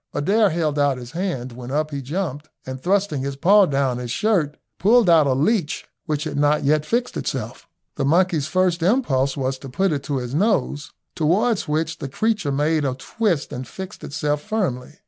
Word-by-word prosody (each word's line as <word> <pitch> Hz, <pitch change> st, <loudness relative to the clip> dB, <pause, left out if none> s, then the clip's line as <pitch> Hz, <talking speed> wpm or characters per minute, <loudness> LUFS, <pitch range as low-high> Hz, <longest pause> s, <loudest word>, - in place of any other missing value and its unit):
Adair 205 Hz, +7 st, +3 dB
held 155 Hz, -3 st, -1 dB
out 140 Hz, -2 st, +2 dB
his 125 Hz, 0 st, -9 dB
hand, 165 Hz, -8 st, -3 dB
when 120 Hz, +1 st, -9 dB
up 155 Hz, +3 st, -1 dB
he 140 Hz, -1 st, -4 dB
jumped, 150 Hz, 0 st, -4 dB, 0.2 s
and 130 Hz, 0 st, -6 dB
thrusting 190 Hz, -5 st, +1 dB
his 140 Hz, 0 st, -3 dB
paw 195 Hz, +7 st, +5 dB
down 135 Hz, -4 st, 0 dB
his 125 Hz, -1 st, -5 dB
shirt 160 Hz, -, +1 dB, 0.2 s
pulled 225 Hz, +2 st, +5 dB
out 160 Hz, -4 st, +6 dB
a 135 Hz, -, +3 dB
leech 155 Hz, -, 0 dB, 0.2 s
which 150 Hz, -2 st, -1 dB
had 150 Hz, -3 st, -4 dB
not 145 Hz, +1 st, +2 dB
yet 150 Hz, +2 st, +2 dB
fixed 240 Hz, +1 st, -1 dB
itself. -, -, -4 dB, 0.3 s
The 145 Hz, -, 0 dB
monkey's 165 Hz, -1 st, +2 dB
first 180 Hz, 0 st, +1 dB
impulse 150 Hz, -, +1 dB
was 130 Hz, -1 st, -2 dB
to 135 Hz, -, -9 dB
put 190 Hz, +8 st, +1 dB
it 145 Hz, -2 st, -1 dB
to 140 Hz, -, -1 dB
his 125 Hz, 0 st, -4 dB
nose, 150 Hz, -5 st, 0 dB, 0.2 s
towards 190 Hz, +6 st, +1 dB
which 155 Hz, +2 st, -1 dB
the 135 Hz, -, -5 dB
creature 210 Hz, -, 0 dB
made 150 Hz, +2 st, +1 dB
a 130 Hz, -2 st, -1 dB
twist 175 Hz, -, -1 dB
and 125 Hz, 0 st, -5 dB
fixed 190 Hz, +7 st, -9 dB
itself 150 Hz, 0 st, -2 dB
firmly. 150 Hz, -, -3 dB
150 Hz, 190 wpm, -22 LUFS, 135-185 Hz, 0.3 s, out